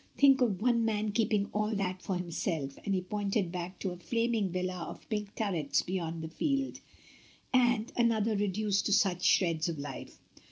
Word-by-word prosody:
Think 275 -1 +6
of 210 -5 +1
one 240 -2 +3
man 215 -1 0
keeping 210 -2 +1
all 210 +1 0
that 185 -2 -2
for 190 - -2
himself," 165 -5 -3
and 200 -2 0
he 185 - 0
pointed 200 -1 -1
back 180 +1 -5
to 190 - -3
a 175 - -7
flaming 230 +1 0
villa 185 -1 -3
with - - -13
pink 210 -2 -3
turrets 175 -10 0
beyond 170 -3 -3
the - - -3
field, 275 - -1 0.7
"and 245 -1 +3
an 235 -1 +4
other 220 0 +1
reduced 205 0 0
to 205 - +2
such 185 -3 +2
shreds 165 -3 +3
of 165 - -3
life." 140 -2 -7
200 Hz, 185 wpm, -31 LUFS, 180-220 Hz, 0.7 s, Think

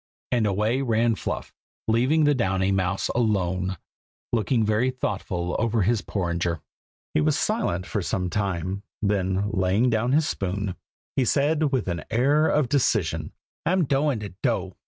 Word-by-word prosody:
and 115 -3 +2
away 105 +6 +1
ran 115 -2 +2
Fluff, - - -4 0.3
leaving 130 +8 +3
the 145 0 +5
Downy 95 -6 +1
mouse 95 -1 0
alone, 95 -5 0 0.6
looking 115 0 +2
very 110 +4 +2
thoughtful 95 -8 -3
over 115 -2 +1
his 110 +2 +2
porringer. 85 -3 -1 0.5
He - - +3
was - - +2
silent 90 +1 0
for 105 - -2
some 90 +1 -1
time; 95 -1 -2 0.2
then 100 0 +1
laying 100 +5 +2
down 115 +3 +1
his 155 +1 +3
spoon, 100 0 -2 0.4
he 135 - +3
said 150 +4 +2
with 130 -7 0
an 85 -2 -2
air 145 +6 +3
of 150 -4 +2
decision, 140 +1 +1 0.3
"I'm 185 +2 +2
doin' 140 -2 +1
to 105 -3 -6
do!" 100 -8 0
105 Hz, 150 wpm, -25 LUFS, 95-125 Hz, 0.6 s, the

